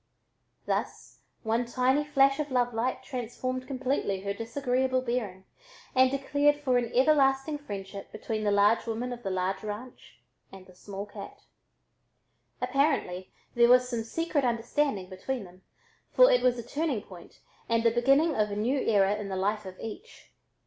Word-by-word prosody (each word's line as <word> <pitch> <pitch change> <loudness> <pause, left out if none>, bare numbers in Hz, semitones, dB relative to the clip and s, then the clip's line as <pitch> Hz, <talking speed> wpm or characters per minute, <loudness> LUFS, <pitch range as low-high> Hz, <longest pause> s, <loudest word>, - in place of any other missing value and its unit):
Thus - - -3 0.2
one 230 +2 0
tiny 255 +4 +2
flash 275 -1 +3
of 300 -1 -2
love 245 -2 +1
light 240 +3 -1
transformed 255 0 -4
completely 260 -7 -1
her 200 0 -2
disagreeable 255 +3 -1
bearing 215 -7 -3 0.5
and 260 0 +5
declared 285 +2 +2
for 265 -4 +1
an 235 -1 -4
everlasting 270 +1 +3
friendship 200 -6 -8
between 215 0 -4
the 210 - +2
large 205 +3 +3
woman 235 +2 -3
of 240 - -9
the 200 - -3
large 185 +1 -1
ranch 215 +4 -8 0.3
and 190 -1 -12
the 185 - -17
small 200 +2 -7
cat. 205 -1 -10 1.2
Apparently 190 - 0 0.2
there 235 0 +5
was 250 0 +6
some 235 -3 -2
secret 305 +4 -1
understanding 235 -3 0
between 205 +6 -4
them, 185 0 -15 0.5
for - - +6
it - - +4
was 245 -1 +2
a 235 - -5
turning 280 -3 -2
point 180 -5 -14 0.3
and 230 0 +2
the 230 - +4
beginning 275 +7 +3
of 210 -1 +1
a 205 - -4
new 240 +7 0
era 200 -5 +3
in 205 -2 -5
the 190 - -3
life 205 +2 -1
of 185 0 -10
each. 310 - -9
240 Hz, 165 wpm, -28 LUFS, 205-270 Hz, 1.2 s, was